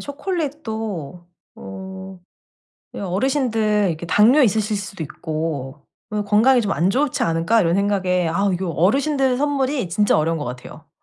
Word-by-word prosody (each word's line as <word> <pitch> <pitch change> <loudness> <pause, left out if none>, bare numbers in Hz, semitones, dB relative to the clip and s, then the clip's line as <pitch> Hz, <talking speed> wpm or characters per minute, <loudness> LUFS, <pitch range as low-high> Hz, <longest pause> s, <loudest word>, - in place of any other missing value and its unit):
초콜릿도 225 - -5 0.3
어 190 - -9 0.7
'어르신들 215 0 0
이렇게 165 0 -4
당뇨 235 - +5
있으실 215 -1 +1
수도 195 -3 -6
있고 155 -3 -5 0.2
그 210 -1 -1
건강이 230 +5 +4
좀 205 -3 -1
안 175 +3 +1
좋지 270 +5 0
않을까?'이런 170 +2 +2
생각에 185 -3 +1
아우 195 +4 +1
이거 180 0 -2
어르신들 265 - +1
선물이 275 -5 0
진짜 205 +4 +2
어려운 165 +2 0
것 145 - -4
같아요. 125 +1 -9
200 Hz, 310 characters per minute, -21 LUFS, 170-245 Hz, 0.7 s, 당뇨